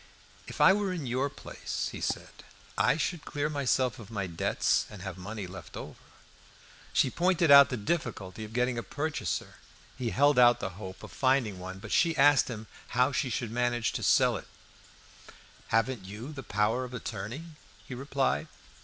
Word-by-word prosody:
"If - - -8
I 190 - +8
were 200 -1 0
in 170 -6 -4
your 130 +3 0
place," - - -5
he - - -7
said, - - -4 0.3
"I - - +3
should 165 -1 -2
clear 145 +1 -2
myself 130 -3 +1
of 110 - -11
my 100 -4 -3
debts, 85 -2 0
and 100 -3 -10
have 95 -3 -5
money 100 +2 -6
left 90 -3 -10
over." - - -9 0.9
She 130 - +2
pointed 175 -3 +2
out 140 0 +10
the 125 - -2
difficulty 105 - -3
of 105 - -8
getting 125 +1 0
a - - -2
purchaser. 150 +5 -3 0.4
He 120 -2 -1
held 140 +6 +4
out 120 -1 +6
the 95 - -3
hope 95 -1 -8
of - - -9
finding 130 -8 +1
one; 95 +1 -7
but 105 +2 -9
she 165 -2 +3
asked 145 0 +5
him 110 -3 -6 0.3
how 125 +3 +4
she 130 -1 0
should 120 -1 -3
manage 120 -1 0
to - - -4
sell - - +4
it. - - -10 1.2
"Haven't 115 0 +1
you 110 +10 -7
your 135 - -7
power 105 +4 +1
of 125 0 -7
attorney?" 115 +5 -5 0.4
he - - -6
replied. 135 - -1
125 Hz, 180 wpm, -29 LUFS, 105-140 Hz, 1.2 s, out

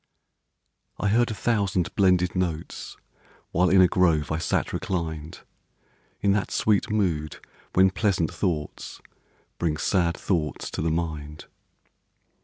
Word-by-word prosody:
I 105 - 0
heard 120 +3 +3
a 110 - -3
thousand 100 -4 0
blended 90 -2 +3
notes 85 -3 -3 0.5
While 90 +2 +3
in 95 0 +6
a 90 - +7
grove 80 -6 +2
I 80 - 0
sat 85 - -1
reclined, 80 -4 -4 0.8
In 100 - +3
that 100 0 0
sweet 105 -2 +1
mood 85 -8 -1 0.4
when 95 0 +5
pleasant 95 -5 0
thoughts 80 -6 -3 0.6
Bring 80 -3 0
sad 85 0 +1
thoughts 80 -6 -2
to - - -3
the 80 - +1
mind. 75 -2 -4
90 Hz, 125 wpm, -25 LUFS, 80-95 Hz, 0.8 s, a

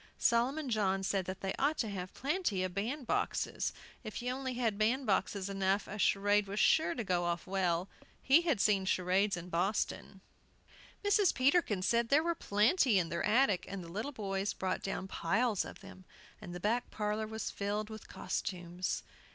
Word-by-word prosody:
Solomon 265 +6 +2
John 195 -5 +1
said 195 -1 0
they 190 +1 -3
ought 295 +3 +2
to 225 - -1
have 185 -2 -5
plenty 275 - 0
of 185 -1 -3
bandboxes; 235 +7 -1 0.3
if 215 -2 -6
you 250 +1 -2
only 260 -1 -4
had 225 -4 0
bandboxes 215 -4 +1
enough 195 0 0
a 210 - -6
charade 205 +1 +3
was 200 +2 -3
sure 320 +6 +4
to 235 - -2
go 180 -3 0
off 170 0 -2
well; 185 -2 0 0.3
he 280 +5 +5
had 320 - +1
seen 200 -2 +3
charades 190 +1 +2
in 175 +1 -7
Boston. 190 +2 -1 0.8
Mrs. 405 -2 +4
Peterkin 255 - +2
said 235 +3 +2
there 295 +3 +4
were 340 0 +1
plenty 230 - +3
in 170 -3 +1
their 170 +1 -2
attic, 215 -3 +3
and 195 -2 -5
the 170 - -10
little 215 +10 -3
boys 200 -4 -2
brought 185 -1 -2
down 195 -1 -3
piles 205 +5 +1
of - - -10
them, 190 -1 -13 0.4
and 175 - -8
the - - -5
back 230 +6 0
parlor 210 0 -2
was 220 0 -4
filled 210 +2 -3
with 220 -1 -9
costumes. 180 0 -3
205 Hz, 175 wpm, -33 LUFS, 190-240 Hz, 0.8 s, he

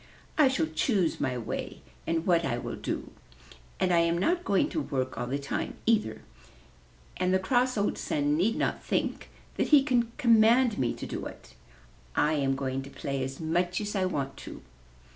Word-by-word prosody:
''I 295 -4 +5
shall 265 -10 +1
choose 165 - 0
my 125 -2 0
way 115 - -5 0.3
and 165 0 0
what 170 -2 +3
I 120 - -1
will - - -5
do. - - -4 0.7
And 180 - +2
I 170 - +5
am 170 0 +2
not 350 - +1
going 200 - +2
to 315 - -2
work 130 - -2
all 120 +1 -3
the 135 +3 -1
time 140 0 -3
either, 215 - +1 0.9
and 180 0 +1
the 190 - +4
cross 245 +6 +1
old 205 - 0
Sun 145 0 0
need 195 +8 +2
not - - -1
think - - -2 0.3
that - - +1
he 295 -3 +6
can 240 -4 +1
command 235 -2 +4
me 125 - 0
to - - -6
do - - -4
it. 65 -1 -13 0.6
I 150 +1 +3
am 135 -3 +1
going 135 -1 -2
to 135 - -9
play 140 -1 -3
as 135 +1 -5
much 175 +3 0
as 210 0 -4
I 190 -1 +1
want 140 -7 -3
to." - - -9
170 Hz, 190 wpm, -28 LUFS, 140-225 Hz, 0.9 s, he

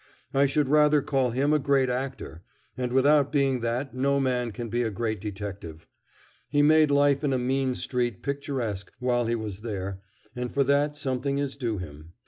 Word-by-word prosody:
I 140 +1 +4
should 140 +1 +1
rather 150 0 +4
call 135 -4 +1
him 135 +5 +1
a 150 - +3
great 135 -1 +2
actor, 125 -9 -4 0.3
and 125 -1 -3
without 140 +2 +4
being 135 -3 +2
that 120 +4 -2
no 140 +2 +1
man 125 -3 0
can 120 +2 -6
be 120 +2 -1
a 115 - 0
great 110 -1 -3
detective. 100 -6 -7 0.6
He 145 0 +3
made 155 0 +5
life 140 0 +3
in 140 -2 +1
a - - +2
mean 130 +1 0
street 120 -6 -2
picturesque 130 -9 -3
while 120 -2 0
he 120 - +1
was 105 -4 -5
there, 100 -4 -5 0.3
and 125 0 -4
for 140 - +2
that 145 +2 +1
something 140 0 -2
is 140 -1 -2
due 120 -6 -2
him. 80 -2 -9
130 Hz, 185 wpm, -26 LUFS, 115-140 Hz, 0.6 s, made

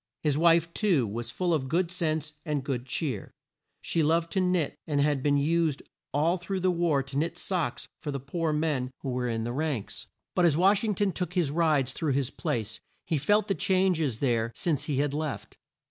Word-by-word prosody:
His 150 -3 +2
wife, 165 +1 +4
too, 180 - +2
was 115 +3 -4
full 180 -2 0
of 130 -5 -1
good 170 +3 +1
sense 155 -4 -1
and 150 -4 -2
good 130 -2 -3
cheer. 130 -4 -3 0.5
She 165 - +1
loved 165 +2 +2
to 190 - +1
knit, 180 -4 +1
and 145 -2 0
had 145 -1 +2
been 145 +1 +3
used 155 0 +1 0.3
all 160 +6 +2
through 185 +2 -3
the 185 0 +3
war 170 -5 +1
to 135 +1 -6
knit 170 +3 -1
socks 175 -9 -2
for 150 - -6
the 140 -1 -2
poor 160 +5 -2
men 150 -4 0
who 135 - -4
were 125 0 -1
in 115 -1 -1
the 120 +1 -3
ranks. 140 -6 -3 0.3
But 180 - +3
as 155 -3 +4
Wash 195 +4 +4
ing 215 -3 0
ton 205 0 +1
took 180 0 -4
his 170 -6 +2
rides 150 -5 +2
through 155 -3 -1
his 135 -1 0
place, 110 -2 -3 0.3
he 155 - 0
felt 205 +8 +2
the 195 - +2
changes 180 - +1
there 115 -4 +1
since 150 -6 0
he 145 -3 -1
had 145 0 +1
left. 150 -1 -4
155 Hz, 210 wpm, -28 LUFS, 135-175 Hz, 0.5 s, wife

